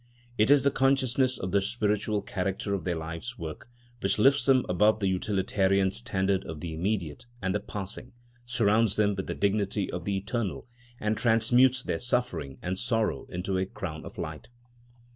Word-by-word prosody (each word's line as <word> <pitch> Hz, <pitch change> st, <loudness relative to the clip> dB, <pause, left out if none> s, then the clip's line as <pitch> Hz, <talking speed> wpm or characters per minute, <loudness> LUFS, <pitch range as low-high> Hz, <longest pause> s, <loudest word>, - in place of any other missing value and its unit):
It 110 Hz, +1 st, +3 dB
is 145 Hz, -1 st, +6 dB
the 140 Hz, -, +3 dB
consciousness 130 Hz, -1 st, +2 dB
of 90 Hz, -, -4 dB
the 100 Hz, +1 st, +3 dB
spiritual 105 Hz, -1 st, 0 dB
character 95 Hz, +1 st, -2 dB
of 100 Hz, -, -3 dB
their 90 Hz, -2 st, 0 dB
life's 85 Hz, +9 st, -6 dB
work, 80 Hz, +5 st, -7 dB, 0.3 s
which 95 Hz, -1 st, 0 dB
lifts 135 Hz, +4 st, +4 dB
them 130 Hz, -2 st, +5 dB
above 105 Hz, +4 st, +3 dB
the 100 Hz, -, +1 dB
utilitarian 95 Hz, 0 st, +1 dB
standard 100 Hz, -4 st, 0 dB
of 80 Hz, -2 st, -6 dB
the 85 Hz, 0 st, -5 dB
immediate 95 Hz, +4 st, -2 dB
and 95 Hz, -3 st, -1 dB
the 105 Hz, -, +1 dB
passing, 105 Hz, +5 st, -7 dB, 0.3 s
surrounds 115 Hz, -3 st, +2 dB
them 105 Hz, -1 st, +2 dB
with 95 Hz, -1 st, -4 dB
the -, -, -3 dB
dignity 100 Hz, 0 st, 0 dB
of 90 Hz, -1 st, -5 dB
the 100 Hz, -1 st, 0 dB
eternal, 100 Hz, -, -3 dB, 0.3 s
and 105 Hz, +1 st, 0 dB
transmutes 120 Hz, +3 st, +4 dB
their -, -, -2 dB
suffering 125 Hz, -, -1 dB
and 90 Hz, +1 st, -2 dB
sorrow 115 Hz, -2 st, 0 dB
into 95 Hz, +1 st, -2 dB
a 95 Hz, -, -1 dB
crown -, -, -6 dB
of -, -, -10 dB
light. -, -, -6 dB
100 Hz, 175 wpm, -28 LUFS, 95-120 Hz, 0.3 s, is